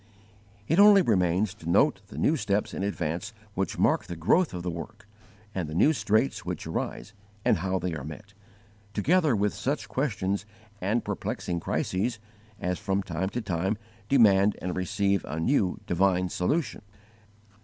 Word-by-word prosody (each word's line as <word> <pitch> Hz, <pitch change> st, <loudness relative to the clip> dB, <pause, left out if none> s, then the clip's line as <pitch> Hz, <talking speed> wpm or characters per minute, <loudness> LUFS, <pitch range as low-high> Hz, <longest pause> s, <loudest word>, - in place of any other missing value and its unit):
It 165 Hz, +5 st, +2 dB
only 205 Hz, -2 st, +8 dB
remains 95 Hz, -, +2 dB
to 85 Hz, -6 st, -8 dB
note 95 Hz, +1 st, +3 dB
the 105 Hz, -, -11 dB
new 155 Hz, -, +3 dB
steps 105 Hz, -7 st, -1 dB
in -, -, -4 dB
advance 95 Hz, +1 st, -2 dB, 0.2 s
which 95 Hz, -3 st, -2 dB
mark -, -, +2 dB
the 85 Hz, -, -6 dB
growth 115 Hz, -, +2 dB
of 90 Hz, -2 st, -5 dB
the 90 Hz, -, -2 dB
work, 100 Hz, +6 st, -8 dB, 0.5 s
and 90 Hz, -5 st, -3 dB
the 75 Hz, -, -6 dB
new 145 Hz, -, +5 dB
straits 110 Hz, +1 st, +1 dB
which -, -, -4 dB
arise 105 Hz, -, -4 dB, 0.3 s
and -, -, +4 dB
how 95 Hz, +2 st, -1 dB
they 90 Hz, -1 st, -2 dB
are 75 Hz, -4 st, -5 dB
met, 100 Hz, +7 st, -9 dB, 0.6 s
together 155 Hz, -, +3 dB
with 105 Hz, 0 st, +1 dB
such 130 Hz, -5 st, -2 dB
questions 100 Hz, -5 st, -1 dB, 0.4 s
and 105 Hz, +6 st, 0 dB
perplexing 100 Hz, -3 st, -3 dB
crises 105 Hz, +8 st, -1 dB, 0.4 s
as 90 Hz, 0 st, -2 dB
from 95 Hz, 0 st, -1 dB
time 90 Hz, +2 st, -2 dB
to 120 Hz, -, -3 dB
time 95 Hz, +2 st, -1 dB, 0.3 s
demand 105 Hz, -6 st, +5 dB
and 90 Hz, 0 st, -3 dB
receive 100 Hz, +1 st, 0 dB
a 75 Hz, +2 st, -4 dB
new 95 Hz, -, +1 dB
divine 90 Hz, 0 st, +2 dB
solution. 120 Hz, -, -1 dB
100 Hz, 160 wpm, -27 LUFS, 90-110 Hz, 0.6 s, only